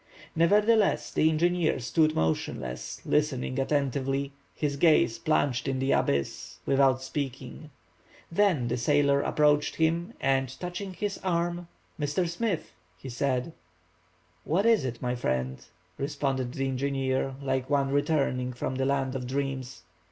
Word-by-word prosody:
Nevertheless 205 +5 +3
the 155 - +3
engineer 170 +1 +1
stood 155 +6 +2
motionless, 65 -6 -2
listening 140 -3 0
attentively, 140 0 0 0.2
his 145 -2 -1
gaze 150 -6 +3
plunged 140 -5 +1
in 135 -1 0
the 135 +1 0
abyss, 70 -1 -1
without 135 -1 +3
speaking. 135 +1 -5 0.6
Then 170 -9 +2
the 120 - -1
sailor 140 +2 +3
approached 150 0 +2
him, 165 +2 0
and, 135 -1 +1
touching 185 +2 -5
his 205 +1 -3
arm:— 175 -1 -1 0.3
"Mr. 150 +5 0
Smith," 175 +1 -2 0.2
he 135 - -9
said. 130 +4 -1 0.9
"What 185 +7 +1
is 225 -11 +4
it, 125 -1 -5
my 125 0 0
friend," 65 - -2 0.4
responded 135 -3 -2
the 135 0 -1
engineer, 135 0 -1
like 130 -1 -2
one 140 -2 +1
returning 140 -3 0
from 125 +2 -3
the 135 0 0
land 135 -1 0
of 125 -2 -4
dreams. 130 -5 -3
140 Hz, 130 wpm, -28 LUFS, 130-160 Hz, 0.9 s, is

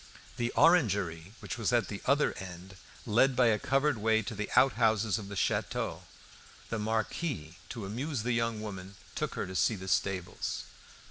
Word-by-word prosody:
The 120 -1 0
orangery, 100 - +3
which - - -5
was 115 - +1
at 120 -2 +2
the 100 - -6
other 140 +3 +3
end, 95 0 -9 0.3
led 125 +5 +3
by 125 -1 +5
a 105 -2 +2
covered 135 0 +1
way 110 +1 +2
to 115 - -5
the 105 0 -4
outhouses 110 -4 +3
of 100 - -8
the 100 - -7
château. - - -1 0.7
The 115 - -1
Marquis, 110 - -2
to 115 -5 -5
amuse 125 +4 -3
the 120 0 0
young 115 -2 0
woman, 95 -2 -7 0.2
took - - -3
her - - -2
to 95 0 -8
see 110 - +3
the 95 -1 -8
stables. 95 -1 -1
110 Hz, 175 wpm, -31 LUFS, 95-120 Hz, 0.7 s, by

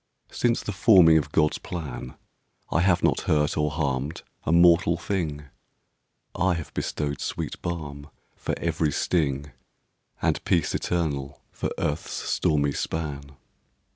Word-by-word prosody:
Since 120 -1 +1
the - - -3
forming 95 -6 +6
of 75 -1 -6
God's 75 -1 +2
plan 70 -7 -6 0.6
I 85 - +2
have 90 -1 +3
not - - +2
hurt 75 -1 +2
or 75 -1 +1
harmed 70 0 -2 0.2
a - - +1
mortal 85 0 +5
thing, 80 -7 -2 0.9
I 90 0 +1
have 80 -2 -6
bestowed 75 -1 -3
sweet - - -4
balm 75 -4 -5 0.3
for - - -3
every 80 -2 0
sting, 75 -3 0 0.7
And - - 0
peace 85 -4 +1
eternal 70 -6 -2
for - - -3
earth's 75 +2 -2
stormy 70 -2 +1
span. 70 -2 -4
80 Hz, 130 wpm, -26 LUFS, 70-85 Hz, 0.9 s, forming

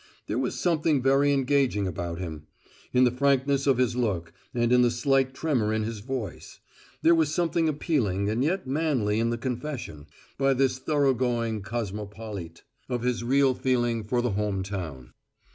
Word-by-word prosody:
There 110 - -2
was 130 - -2
something 160 -4 +2
very 135 +2 +4
engaging 135 -6 +2
about 85 -1 -4
him: 80 -4 -6 0.4
in 125 0 +4
the 125 - +4
frankness 140 +1 +1
of 135 -3 +4
his 125 -2 +1
look 95 -9 -1 0.2
and 120 -1 +1
in 125 - +6
the 120 - +4
slight 135 +2 +1
tremor 130 -10 0
in 110 0 0
his 110 0 -4
voice; 125 0 -6 0.4
there 165 - +6
was 160 -3 +2
something 165 0 +1
appealing 125 - 0
and 110 +4 0
yet 180 +4 0
manly 130 -7 0
in 115 0 +1
the 120 - -1
confession, 125 - -5 0.3
by 135 0 +3
this 130 -1 +1
thoroughgoing 125 -6 +1
cosmopolite, 105 -4 -6 0.3
of 120 -2 -2
his 125 -1 0
real 135 +2 +3
feeling 120 -3 0
for 120 +3 0
the 125 - 0
home 100 -1 -1
town. 85 -11 -6
125 Hz, 165 wpm, -27 LUFS, 105-135 Hz, 0.4 s, in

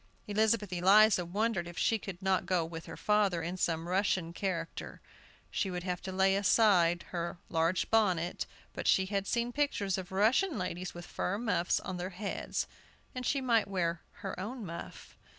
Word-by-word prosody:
Elizabeth 210 -1 +1
Eliza 195 +2 +6
wondered 190 0 -1
if 175 -1 -10
she 225 - +2
could 190 -1 -8
not 190 -1 +1
go 180 -3 +1
with 165 0 -8
her - - -8
father 205 -5 +2
in 175 +3 -3
some 165 -2 -1
Russian 185 -2 0
character. 170 -3 -4 0.5
She 195 - -1
would 180 -1 -4
have 180 -1 -3
to 190 - -5
lay 190 +1 +3
aside 190 -4 +4
her 170 -1 -3
large 165 +2 +1
bonnet, 185 -6 +2 0.3
but - - -4
she 190 - +4
had 195 0 -2
seen 235 0 0
pictures 205 -10 0
of 185 -1 -8
Russian 235 - +3
ladies, 180 -1 -4
with 175 - -8
fur 190 +3 -2
muffs 205 -6 +1
on 185 -1 -5
their 180 +1 -3
heads, 200 +2 -3 0.5
and 255 - -4
she 275 - +1
might 230 -4 +3
wear 170 -4 -1 0.2
her - - -4
own 225 +4 -5
muff. 170 -1 -8
190 Hz, 175 wpm, -32 LUFS, 175-210 Hz, 0.5 s, Eliza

